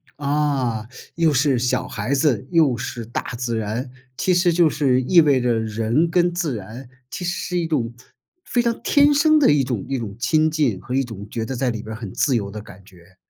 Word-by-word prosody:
啊， 140 -6 -1 0.3
又 160 -3 +2
是 135 -2 +2
小 125 +1 0
孩 110 +6 -3
子， 135 -5 +1
又 150 -8 +3
是 120 -1 -5
大 120 - -3 0.2
自 120 -2 -2
然。 110 +4 -3 0.3
其 185 - +1
实 175 0 +3
就 170 -1 +4
是 135 -4 +1
意 170 +6 +5
味 140 -4 +3
着 120 -2 +1
人 115 +9 0
跟 175 0 +2
自 165 -8 -2
然， 115 +5 -9 0.2
其 180 - -5
实 175 - 0
是 180 0 -3
一 165 - -2
种 120 -7 -1 0.5
非 245 - 0
常 235 -1 -1
天 290 0 +4
生 310 +2 +4
的 285 - +5
一 145 -2 +3
种 125 -6 -3
一 135 -2 -2
种 100 -3 -6
亲 155 +5 +2
近 140 -11 0
和 125 - -5
一 135 - +2
种 105 -4 -8
觉 115 -1 -3
得 130 - -4
在 125 +1 0
里 110 -2 -4
边 110 0 -7
儿 - - -11
很 105 -5 -7
自 135 - +1
由 100 -4 -1
的 105 +1 -7
感 95 -1 -14
觉。 90 -1 -20
130 Hz, 240 characters per minute, -21 LUFS, 115-155 Hz, 0.5 s, 意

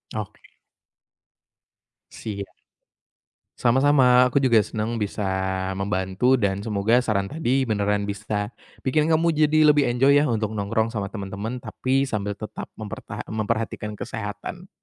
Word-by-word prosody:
Oke. 105 -2 -7 1.6
Siap, 100 -3 -6 1.1
sama-sama 125 0 +5
aku 140 - +3
juga 120 -6 +4
senang 110 +3 -3
bisa 105 +1 -3 0.5
membantu 95 +6 +1
dan 100 -2 0
semoga 110 +3 +2
saran 105 -5 0
tadi 135 0 0
beneran 105 -2 0
bisa, 105 +1 -3 0.3
bikin 150 +4 +2
kamu 165 +1 +3
jadi 155 0 +4
lebih 145 - +4
enjoy 135 +4 +4
ya 145 -2 +4
untuk 110 -1 -1
nongkrong 110 +2 -1
sama 100 -1 -3
teman-teman 100 +4 -5
tapi 135 +3 -1
sambil 105 -4 -3
tetap 110 - -7
mempertaha 110 -2 -7
memperhatikan 110 -1 -3
kesehatan. - - -6
110 Hz, 120 wpm, -24 LUFS, 105-130 Hz, 1.6 s, sama-sama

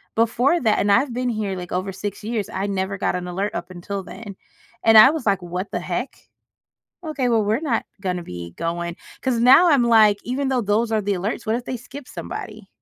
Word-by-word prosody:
Before 245 +8 +2
that 220 -4 +2
and 205 - +2
I've 260 +7 +3
been 250 +1 -2
here 215 -4 -2
like 180 -1 -7
over 185 +2 -2
6 200 +1 -6
years, 220 -2 -3
I 195 +2 -3
never 195 0 -2
got - - 0
an 180 0 -4
alert 195 +4 -3
up 175 +2 -5
until 190 +2 -5
then, 205 -1 -9 0.5
and 225 0 +5
I 215 +5 +10
was 310 -4 -3
like, 195 -3 +2
"What 180 +3 -5
the - - -2
heck?" - - -4 0.9
Okay, 285 -5 -1
well, 225 -3 +2
we're 215 +5 +1
not 275 -8 -1 0.2
gonna 180 -3 -2
be 85 - -8
going 170 +1 -3 0.2
'cause 255 -3 0
now 270 +9 +7
I'm 275 -6 +4
like, 215 -3 +5
even 265 +3 -2
though 255 -3 +1
those 215 +3 +1
are 215 - +1
the 200 0 0
alerts, 200 +6 -3
what 220 +2 +1
if 245 - -6
they 255 - -3
skip 255 +3 -11
somebody? 215 -2 -7
215 Hz, 220 wpm, -22 LUFS, 190-240 Hz, 0.9 s, I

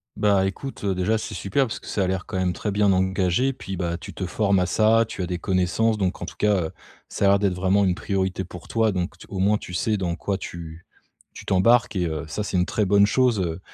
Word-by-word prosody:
Bah, 100 -2 +3
écoute, 120 +8 -5
heu, 100 -1 +1
déjà 95 +5 +1
c'est 110 - -6
super, 115 +8 0
parce 115 - -5
que - - -14
ça 100 - 0
a - - 0
l'air 95 +1 -2
quand - - -4
même 90 -1 0
très 105 - -4
bien 100 0 +3
engagé. 95 +6 +1
Puis, 95 -7 -7
bah, 85 -1 -2
tu - - -10
te 95 - -4
formes 100 +1 +1
à 90 - +1
ça, 115 +1 +3
tu 100 - -5
as - - -1
des 90 0 -3
connaissances 95 +4 +1
donc 95 -2 -1
en - - -3
tout - - -9
cas, 100 -6 +1 0.4
ça - - -1
a - - +6
l'air 100 0 +4
d'être 100 -3 +1
vraiment 95 +2 +2
une 90 -2 +2
priorité 95 -1 -2
pour 90 -1 -11
toi. 110 -1 +1
Donc 90 -1 -3
t - - -13
au 95 - -5
moins 100 +3 +3
tu 90 - -10
sais 110 +4 0
dans 90 -3 -2
quoi 100 +2 -2
tu 85 -3 -8 0.5
tu - - -11
t'embarques 110 +4 +3
et 90 -2 +1
heu, 80 -2 -3
ça 90 +8 -3
c'est 100 - -2
une 90 - +1
très 105 - 0
bonne 100 +1 +5
chose, 125 -1 +2
heu, 85 -2 -2
95 Hz, 260 wpm, -24 LUFS, 90-105 Hz, 0.5 s, a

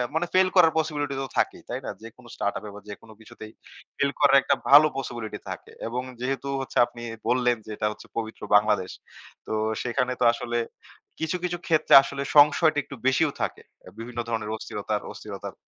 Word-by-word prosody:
মানে 165 +2 +1
ফেইল 185 0 +4
করার 165 -3 +6
পসিবিলিটি 145 -3 -2
তো 135 - -4
থাকেই। - - -1
তাই - - -3
না? - - -4
যেকোনো 120 +2 -13
স্টার্ট 100 - -1
আপ - - -19
এ - - -7
বা 105 - -10
যেকোনো 110 +2 -11
কিছুতেই 110 0 -12 0.5
ফেইল 140 0 +1
করার 140 -2 +6
একটা 140 - +2
ভালো 150 +2 +9
পসিবিলিটি 120 -4 -5
থাকে, - - -8 0.2
এবং 120 +2 -3 0.2
যেহেতু 135 +2 -2
হচ্ছে 135 - -6
আপনি 120 0 -12 0.3
বললেন 125 -1 +2
যে 110 - -8
এটা 105 - 0
হচ্ছে 105 - -12
পবিত্র 110 -1 -5
বাংলাদেশ। 105 -3 +2 0.6
তো - - -3 0.3
সেখানে 125 +1 -1
তো - - +4
আসলে 120 0 -3 0.6
কিছু, 160 +3 -1
কিছু 175 0 -2
ক্ষেত্রে 160 -2 +2
আসলে 140 - -5 0.2
সংশয়টা 150 +1 +6
একটু 140 - -10
বেশিও 140 +3 +3
থাকে। - - -3 0.2
আ - - -9
বিভিন্ন 120 +1 -7
ধরনের 110 -2 -2
অস্থিরতা - - -4 0.2
অস্থিরতার - - -8
125 Hz, 185 wpm, -25 LUFS, 115-145 Hz, 0.6 s, ভালো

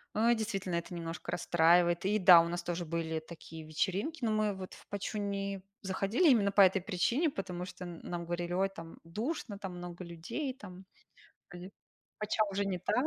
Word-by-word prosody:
Э, 230 +3 +4
действительно 200 -5 -2
это 170 +1 -3
немножко 165 0 -5
расстраивает. 175 +1 +3
И 210 +2 +3
да, 180 -2 +9
у 170 - -1
нас 175 0 -3
тоже 175 0 -3
были 160 0 -2
такие 160 0 -10
вечеринки, 200 - -2
но 220 - +2
мы 215 -1 +1
вот 190 -1 -8
в - - -17
"Пачу" 205 +1 -4
не 200 -1 -2 0.2
заходили 200 - +2
именно 200 -6 +4
по 200 - +6
этой 190 0 +6
причине, 230 - +1
потому 180 -6 -5
что 185 - -9
н 175 -2 -7
нам 175 -1 -4
говорили: 175 +1 -3
"Ой, 190 +2 +2
там 165 -4 -10
душно, 215 - -4
там 190 -3 -6
много 175 0 -7
людей, 170 - -4
там 190 -6 -11 0.6
оди 180 +1 -9 0.5
"Пача" 215 +1 +1
уже 200 +1 -1
не 190 -2 -1
та". 205 +3 -1
185 Hz, 190 wpm, -32 LUFS, 175-205 Hz, 0.6 s, да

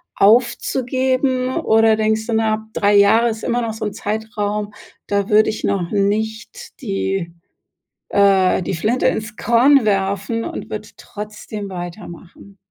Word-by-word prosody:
aufzugeben 255 +3 +1
oder 225 0 +3
denkst 220 0 0
du: 230 - -3
„Na, 220 -1 +2
ab 215 - -8
3 205 0 +2
Jahre 220 +4 +5
ist 220 0 -6
immer 240 0 0
noch 225 -2 -3
so 220 0 -5
'n 210 - -3
Zeitraum, 210 0 -3 0.3
da 200 0 -1
würde 215 +1 +4
ich 215 - -7
noch 175 -3 -1
nicht 220 - -3
die 195 -6 -3 0.8
äh, 195 -2 +3
die - - -3
Flinte 215 +9 0
ins 215 -1 -2
Korn 250 +4 +4
werfen 200 +2 -1
und - - -6
würde - - -6
trotzdem 210 0 -8
weitermachen?“ 180 +1 -10
215 Hz, 140 wpm, -19 LUFS, 200-230 Hz, 0.8 s, Jahre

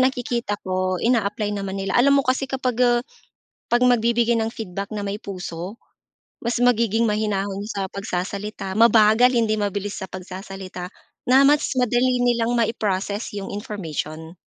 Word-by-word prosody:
nakikita 245 -4 0
ko, 185 0 0
ina-apply 210 -3 +1
naman 195 -1 -4
nila. 195 0 -2
Alam 280 +3 +5
mo - - -3
kasi, 260 +1 +1
kapag, 255 -3 -2
eh, 240 -1 +4 0.7
'pag 240 +1 +3
magbibigay 235 -1 +3
ng 225 0 -1
feedback 200 -3 -6
na 205 - -3
may 200 +1 -3
puso, 185 0 -7 0.6
mas 235 0 -1
magiging 230 -2 +3
mahinahon 205 -2 -1
sa 200 -3 -3
pagsasalita, 195 0 -4
mabagal, 225 +1 +6
hindi 220 -2 +2
mabilis 205 0 -2
sa 190 - -4
pagsasalita, 185 -1 -7 0.4
na, 260 +2 +6
mas 290 +1 +4
madali 250 0 +2
nilang 240 -1 +1
mai-process 210 -2 -1
'yong 195 -1 -5
information. 165 -5 -5
210 Hz, 140 wpm, -22 LUFS, 195-240 Hz, 0.7 s, mabagal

